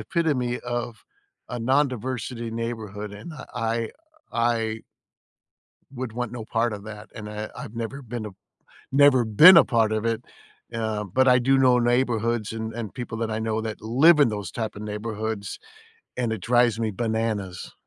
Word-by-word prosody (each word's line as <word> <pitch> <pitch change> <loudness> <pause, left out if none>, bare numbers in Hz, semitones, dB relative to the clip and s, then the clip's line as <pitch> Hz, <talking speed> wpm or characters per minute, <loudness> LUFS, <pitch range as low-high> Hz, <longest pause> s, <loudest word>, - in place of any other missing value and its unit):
epitome 135 -8 0
of 120 -2 -4 0.4
a 125 - -4
non-diversity 125 -2 -1
neighborhood, 110 -3 -5
and, 105 +11 -9
uh, 140 -3 -9
I 115 0 -1 0.4
I 115 -2 0 1.1
would 125 -3 -5
want 125 -1 -3
no 120 -3 -6
part 115 0 0
of 100 -1 -7
that, 105 -1 -9
and 105 -1 -7
I 105 0 -5
I've 110 - -8
never 115 +4 -4
been 120 -3 -6
a - - -5 0.6
never 135 -2 +6
been 155 - +9
a - - +9
part 115 -3 +2
of 110 +1 -1
it, 115 +1 -1 0.5
uh, 110 -2 -2
but 130 +8 +2
I 125 0 +6
do 135 +2 +3
know 125 -2 +5
neighborhoods 120 -2 +1
a - - -5
and 110 -1 -5
people 120 -3 -5
that 115 -1 -2
I 110 - -2
know 110 0 -1
that 110 -1 -5
live 140 +9 +5
in 145 - +5
those 105 -2 -4
type 110 -3 -4
of 105 - -8
neighborhoods, 105 -1 -4 0.6
and 120 -2 0
it 110 - -6
drives 120 -1 +3
me 110 -2 0
bananas. 110 -4 -2
115 Hz, 170 wpm, -25 LUFS, 110-125 Hz, 1.1 s, been